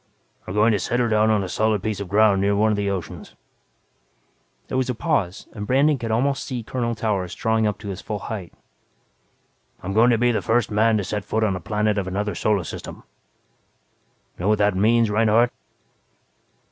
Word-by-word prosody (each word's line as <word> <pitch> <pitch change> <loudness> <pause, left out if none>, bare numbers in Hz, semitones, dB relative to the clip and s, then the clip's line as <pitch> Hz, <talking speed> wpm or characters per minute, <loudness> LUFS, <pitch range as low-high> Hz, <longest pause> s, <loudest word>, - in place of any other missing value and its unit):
"We're 90 - -5
going 110 +2 +4
to 105 - +1
set 120 - -1
her 120 - +2
down 110 0 +3
on 105 -2 +2
a - - -4
solid 110 +1 0
piece 110 -2 -2
of 100 - -5
ground 100 -1 +4
near 100 +1 +2
one 110 +2 +3
of - - +1
the 100 -1 -1
oceans." 95 -3 -6 1.3
There - - -5
was 130 -1 -1
a 125 - -1
pause 115 - -1
and 105 -2 -6
Brandon 140 +2 +3
could 115 -1 -4
almost 135 +5 0
see 125 -3 -5
Colonel 120 0 -2
Towers 100 -5 -2
drawing 110 -2 +1
up 105 -1 -2
to 100 0 -8
his 95 0 -6
full 105 - -4
height. 95 -3 -6 1.3
"I'm 95 +2 -3
going 115 +4 +5
to 120 - +3
be 120 +1 +2
the 115 - -1
first 115 -1 +1
man 110 +1 +3
to 105 - -1
set 105 +1 -3
foot 110 +2 -1
on 100 -3 +1
a - - -4
planet 105 +3 0
of 95 - -4
another 100 +2 -2
solar 100 +1 0
system. - - -8 1.4
Know 90 - -2
what 105 0 +3
that 105 -2 +2
means, 110 +3 +3
Reinhardt?" 115 +3 +3
110 Hz, 200 wpm, -22 LUFS, 100-115 Hz, 1.4 s, going